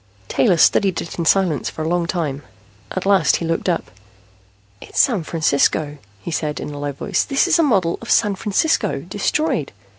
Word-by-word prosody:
Taylor 185 - +2
studied 190 +3 +3
it 170 - -7
in 170 - -1
silence 180 -5 +2
for 155 - -6
a - - -2
long 175 0 0
time. 155 -6 -2 0.5
At 185 - -4
last 195 -6 +4
he 170 - -3
looked 165 +3 -1
up. 170 - -2 0.9
"It's - - -5
San 230 -9 +3
Francisco," 150 -2 0 0.2
he 170 - -7
said 150 -1 -2
in 150 - -6
a 145 - -7
low 145 0 -3
voice. 175 +7 -1
"This 275 -1 +1
is - - +3
a - - +6
model 195 - +1
of 235 - -9
San 210 -3 +3
Francisco, 210 +11 0
destroyed. 295 - -1
175 Hz, 185 wpm, -20 LUFS, 155-200 Hz, 0.9 s, a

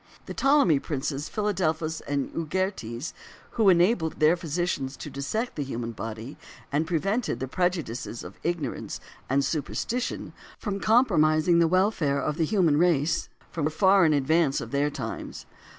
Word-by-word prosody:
The - - -6
Ptolemy 270 - +4
princes 145 +1 -3
Philadelphus 165 -6 -1
and 140 -1 -1
Euergetes, 165 - -3 0.4
who 220 -4 +4
enabled 175 -2 +3
their 155 +3 +5
physicians 165 -5 -2
to 150 - -7
dissect 180 - -3
the 145 - -2
human 120 -3 -4
body, 115 +3 -7 0.3
and 150 +3 0
prevented 195 +8 0
the 130 - -3
prejudices 160 -9 -2
of - - -11
ignorance 165 -7 -3 0.3
and 140 +1 +2
superstition 225 - -3 0.2
from 200 -3 -3
compromising 170 -8 +4
the 170 - +5
welfare 180 -6 +2
of 150 +2 -2
the 165 - +2
human 170 -5 +3
race, 165 -2 +2 0.3
were 155 -3 0
far 190 +4 +4
in 155 -2 +4
advance 145 +1 +2
of - - -7
their 140 +1 +1
times. 120 -6 -6
160 Hz, 145 wpm, -26 LUFS, 140-185 Hz, 0.4 s, their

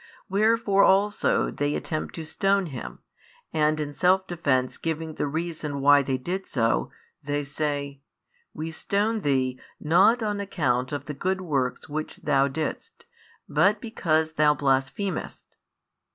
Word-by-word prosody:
Wherefore 210 0 +3
also 205 +2 +3
they 145 +1 -1
attempt 155 -1 -4
to 165 - -6
stone 195 +4 +1
Him, 120 - -7 0.5
and 155 0 +2
in 145 -1 -3
self 185 +4 +3
defence 140 -8 0
giving 160 -1 -3
the 145 - -2
reason 155 -2 -3
why 145 +1 +6
they 130 -1 -1
did 180 +9 -4
so, 115 - +1 0.3
they 145 0 -2
say: 140 -1 -3 0.5
"We 160 +1 -5
stone 210 +6 0
Thee, 130 -6 0 0.2
not 195 +10 +4
on 210 -1 -1
account 130 -10 -1
of 145 - -4
the 150 - -5
good 190 +7 -1
works 140 -8 -2
which 155 +1 -4
Thou 135 0 +2
didst, 160 - -5 0.4
but 205 +2 +3
because 160 -9 0
Thou 150 -1 +3
blasphemest." 140 +7 -2
155 Hz, 140 wpm, -26 LUFS, 140-190 Hz, 0.5 s, why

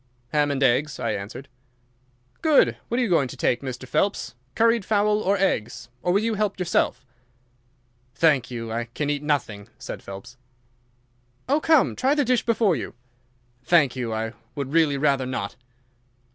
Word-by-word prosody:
"Ham 150 +1 +2
and 140 -1 0
eggs," 135 +3 +2
I 115 -3 -1
answered. 105 +7 -6 0.9
"Good! 310 -3 +4
What 240 - -1
are - - +2
you - - +1
going 165 -8 +2
to - - -10
take, 120 - +1
Mr. 130 -1 -6
Phelps—curried 195 - 0
fowl 210 +1 +2
or 200 +1 +1
eggs, 125 - -1
or 175 - 0
will 200 +4 +2
you 230 0 0
help 210 -1 -1
yourself?" 170 -7 0 1.1
"Thank 140 -5 +3
you. 115 -2 -5
I 115 +1 -2
can 145 +5 -3
eat 145 -1 -2
nothing," 125 -9 -2
said - - -7
Phelps. 100 +6 -10 1.1
"Oh, 285 +4 +2
come! 315 -3 +3
Try 265 +3 +2
the 290 -2 +2
dish 250 0 +2
before 220 -6 +3
you." 125 - -6 0.7
"Thank 145 -5 +3
you, 120 -3 -3
I 110 +1 -3 0.2
would 140 -1 -4
really 160 -4 +3
rather 135 -2 +1
not." 100 -6 -4
145 Hz, 160 wpm, -24 LUFS, 125-200 Hz, 1.1 s, Good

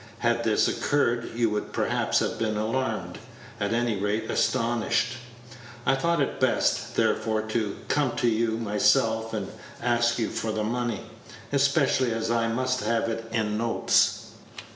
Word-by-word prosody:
Had 120 0 +1
this 110 -2 +3
occurred, 120 -5 0
you 115 -2 +1
would 105 0 -3
perhaps - - 0
have - - -2
been 110 -1 0
alarmed, 115 +5 -2 0.4
at 100 0 -1
any 115 -2 0
rate 105 +3 -1
astonished. 120 0 +1 0.7
I - - +4
thought 170 +5 +1
it 140 - -1
best, 130 -2 +1
therefore, 110 -1 +1
to 110 -2 -2
come 135 -4 +1
to 120 0 +1
you 115 0 +1
myself 110 +1 +2
and 105 -3 -3 0.3
ask 120 -1 +1
you 115 - -1
for 110 - -2
the 110 0 -2
money, 120 -1 -2 0.5
especially 140 -2 +2
as 115 0 -1
I 115 -1 +1
must 130 +3 0
have 115 -2 0
it 115 0 -4
in 110 -2 -1
notes." 115 0 +1
115 Hz, 150 wpm, -26 LUFS, 110-120 Hz, 0.7 s, I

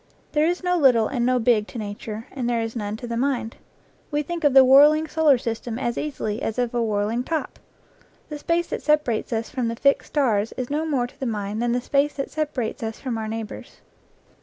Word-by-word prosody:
There 305 +1 +2
is 355 +2 -1
no 360 0 +2
little 250 -8 +4
and 245 -3 -1
no 255 0 +3
big 225 -3 +2
to - - -9
nature, 215 +1 -6
and 250 -3 -3
there 235 -1 +1
is 225 +1 -5
none 210 -1 -3
to 240 - -8
the 235 -1 -4
mind. 245 -2 -1 0.5
We 295 0 -1
think 340 +2 -5
of 285 -2 +3
the 265 -1 +9
whirling 295 +4 +6
solar 310 -3 +4
system 230 0 -4
as 240 -2 -2
easily 230 -8 -3
as 220 - -3
of 245 -1 -1
a 240 - 0
whirling 215 +2 0
top. 320 +2 -3 0.7
The 300 -1 -6
space 340 +3 0
that - - -3
separates 300 -8 +1
us 225 0 -2
from 250 -3 -1
the 230 - -2
fixed 280 +4 +2
stars 230 -7 +1
is 255 +1 -4
no 310 +2 -1
more 270 -6 +1
to 245 - -13
the 265 - -2
mind 210 -1 -3
than 240 0 +1
the 245 - 0
space 280 +3 +1
that 275 - -4
separates 295 -7 -3
us 220 -1 -4
from 255 -4 -3
our 220 -1 -3
neighbors. 220 -1 -7
245 Hz, 225 wpm, -23 LUFS, 225-290 Hz, 0.7 s, the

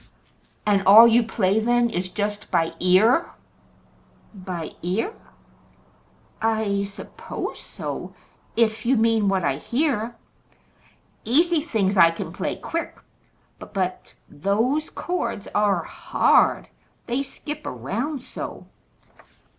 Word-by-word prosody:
"And 205 -2 +3
all 215 +4 +10
you 235 +1 +5
play 215 -3 +1
then 240 +1 +2
is 180 +1 -3
just 205 +1 -3
by 165 0 +1
ear?" 215 - +4 1.0
"By 185 -5 -6
ear? 195 - -1 1.3
I 220 -3 +1
suppose 200 0 -7
so - - -7 0.4
if 225 -1 +1
you 255 +2 +2
mean 225 -2 +2
what 190 -2 0
I 140 -3 0
hear. 240 - -1 1.1
Easy 325 +7 +3
things 205 - 0
I 170 -2 +8
can 165 - -6
play - - -3
quick, 335 0 -5 0.6
but - - -12
but 185 -1 -3
those 225 - 0
chords 235 - -3
ARE 200 -5 +2
hard; - - +2 0.4
they 245 +3 -1
skip 295 +2 -7
around 235 - -4
so!" - - -7
220 Hz, 110 wpm, -23 LUFS, 190-240 Hz, 1.3 s, all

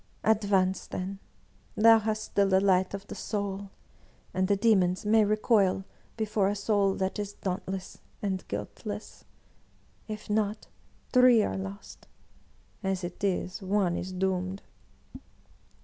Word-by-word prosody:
"Advance, 200 -3 +2
then; 195 +1 -5 0.6
thou 225 +1 +7
hast 215 0 -2
still 200 -1 +1
the 190 0 +5
light 190 0 +2
of 200 0 -8
the - - -8
soul, 200 -2 -4 0.6
and 185 0 +1
the 200 - +3
demons 195 -3 +2
may 220 +1 +5
recoil 205 -2 +2 0.3
before 215 -3 +1
a 205 - 0
soul 200 -1 +1
that 190 +2 -2
is 205 -1 -4
dauntless 190 0 -5 0.2
and 190 -2 -2
guiltless. - - -6 0.8
If 215 -1 -6
not. 210 0 -1 0.5
Three 250 -3 +6
are 95 - -2
lost! 95 +1 -8 0.4
— - - -34
^as 190 -1 -1
it 175 +3 -7
is. 185 0 -1
One 190 -2 +1
is 185 +2 -4
doomed.' 185 +1 -2
195 Hz, 135 wpm, -28 LUFS, 185-210 Hz, 0.8 s, thou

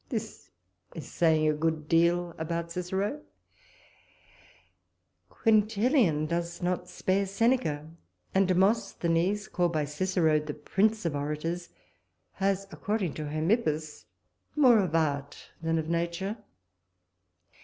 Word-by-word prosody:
This - - -5 0.5
is 160 - -8
saying 160 -2 +3
a 155 - +3
good 155 0 -1
deal 170 +1 +2
about 170 +1 -3
Cicero. 190 +3 -2 2.1
Quintilian 215 - +2
does 170 +1 -3
not 180 0 -2
spare 195 +1 0
Seneca; 195 - +1 0.5
and 195 0 +3
Demosthenes, 190 -1 +1
called 175 -2 0
by 155 -2 0
Cicero 160 0 +1
the 150 -1 -6
prince 210 +7 0
of 160 -3 -1
orators, 150 +4 -3 0.6
has, 195 0 -1
according 205 -6 -2
to 155 -1 -5
Hermippus, 155 -1 -1 0.5
more 255 -7 +6
of 180 -5 0
art 145 -3 -2
than 165 0 0
of 160 -1 -2
nature. 170 +4 -2
170 Hz, 110 wpm, -28 LUFS, 155-195 Hz, 2.1 s, more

